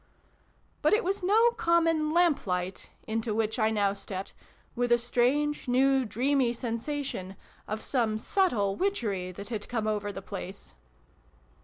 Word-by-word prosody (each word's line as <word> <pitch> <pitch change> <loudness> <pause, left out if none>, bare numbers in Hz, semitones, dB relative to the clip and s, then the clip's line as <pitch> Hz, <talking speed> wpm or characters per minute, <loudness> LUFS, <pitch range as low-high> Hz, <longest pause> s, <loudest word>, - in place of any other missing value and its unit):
But - - +3
it 440 +3 +3
was 390 +2 -1
no 440 +6 +4
common 330 -5 +2
lamplight 205 - +1 0.2
into 220 0 -2
which 220 +2 0
I 220 0 +3
now 205 -2 +1
stepped, 195 -1 -6 0.4
with 245 0 0
a 240 - +7
strange, 255 +5 +1
new, 265 +1 +3
dreamy 255 +2 +1
sensation 235 -4 -4 0.3
of 215 +1 -4
some 230 -5 0
subtle 220 - +1
witchery 210 - -1
that 200 +4 -8
had 215 -3 -5
come 225 -3 -1
over 210 -1 -1
the 195 -1 -8
place. 195 0 -7
235 Hz, 140 wpm, -29 LUFS, 205-295 Hz, 0.4 s, a